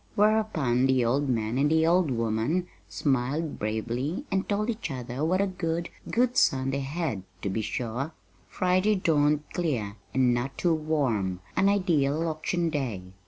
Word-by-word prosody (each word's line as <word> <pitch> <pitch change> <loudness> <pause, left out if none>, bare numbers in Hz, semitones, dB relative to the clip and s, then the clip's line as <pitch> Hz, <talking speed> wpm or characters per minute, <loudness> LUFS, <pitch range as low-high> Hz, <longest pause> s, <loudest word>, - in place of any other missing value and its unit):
Whereupon 205 - +2
the 130 -2 +3
old 135 +4 +1
man 115 0 0
and 145 +1 +3
the 160 0 +3
old 175 -1 +3
woman 115 +8 0 0.2
smiled 140 +3 -1
bravely 120 - -2
and 190 0 0
told 210 +3 +1
each 220 -5 -5
other 125 0 -4
what 185 +4 +2
a - - +3
good, 170 -3 -2 0.2
good 245 +1 +2
son 135 - +3
they 140 - -1
had, 140 - -2 0.2
to 100 - -1
be 110 - -1
sure! 120 +6 -3 0.4
Friday 185 +3 +2
dawned 150 -5 +2
clear, 120 -12 -2
and 130 -2 +3
not 120 +3 -2
too 175 -2 +2
warm 135 - 0 0.2
an 195 +1 +4
ideal 165 -6 +2
auction 165 +2 -1
day. 115 - -3
145 Hz, 160 wpm, -27 LUFS, 120-175 Hz, 0.4 s, an